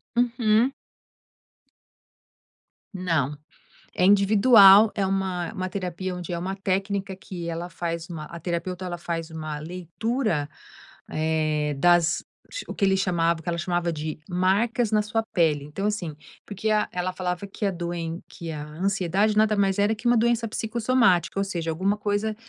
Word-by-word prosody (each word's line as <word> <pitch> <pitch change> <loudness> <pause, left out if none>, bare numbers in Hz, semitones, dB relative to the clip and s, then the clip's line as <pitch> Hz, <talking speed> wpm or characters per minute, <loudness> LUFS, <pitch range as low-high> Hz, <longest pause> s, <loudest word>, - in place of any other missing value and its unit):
Uhum. 240 +1 +2 2.2
Não. 165 -7 0 0.6
É - - +1
individual, 205 +1 +7
é 200 - 0
uma 190 -2 -1
uma 185 -1 -3
terapia 185 -1 -4
onde 180 -1 -7
é 170 - -2
uma 185 +3 -3
técnica 195 0 -2
que 175 -3 -7
ela 170 +1 -4
faz 170 -1 -4
uma 155 -2 -6
a 170 - -8
terapeuta, 175 +2 -3
ela 175 -1 -4
faz 165 -1 -4
uma 155 -2 -5
leitura, 180 - -2 0.6
eh, 155 -1 0
das 170 +2 +3 0.4
o - - -5
que - - -3
ele 190 0 +4
chamava 170 -3 +1
o - - -13
que - - -21
ela 170 - -1
chamava 175 0 -1
de 155 0 -5
marcas 205 +6 +1
na 215 -1 +3
sua 225 +2 -1
pele. 155 -4 +2
Então, 150 +8 -5
assim. 180 -8 -3 0.3
Porque 210 +2 -3
a 215 -1 +2
ela 180 +1 -2
falava 180 +1 -3
que 205 +2 -4
a 195 - +1
doen 170 -1 -4
que 165 -1 -8
a 150 -2 -5
ansiedade 195 +5 0
nada 215 0 +4
mais 195 -1 +1
era 210 +2 +2
que 225 - -15
uma 240 0 +4
doença 235 0 +2
psicossomática, 220 -5 +1
ou - - +2
seja, 170 -4 -3
alguma 190 +5 0
coisa, 210 +1 -1
185 Hz, 160 wpm, -25 LUFS, 170-205 Hz, 2.2 s, individual